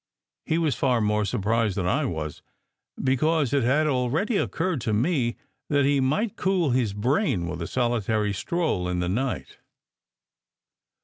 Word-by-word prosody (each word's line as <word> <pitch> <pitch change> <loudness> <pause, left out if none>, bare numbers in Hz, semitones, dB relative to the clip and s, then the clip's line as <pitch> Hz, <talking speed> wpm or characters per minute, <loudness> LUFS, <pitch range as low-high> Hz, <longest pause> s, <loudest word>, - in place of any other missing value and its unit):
He 160 - +1
was 160 -4 +1
far 125 0 +1
more 105 -1 +1
surprised 105 +1 0
than 95 - 0
I 140 +11 +1
was, 75 - -4 0.6
because 140 +1 +1
it 140 - +3
had 135 +6 +2
already 145 - 0
occurred 165 -6 -1
to 110 -1 -1
me 120 +1 +1 0.3
that 145 -2 +3
he 140 0 +3
might 155 - 0
cool 180 -6 +1
his 120 -4 +1
brain 115 - 0
with 85 0 -5
a 85 - -3
solitary 110 -4 0
stroll 105 - -1
in 90 - -1
the 90 - -1
night. 125 +7 -3
125 Hz, 150 wpm, -25 LUFS, 105-155 Hz, 0.6 s, it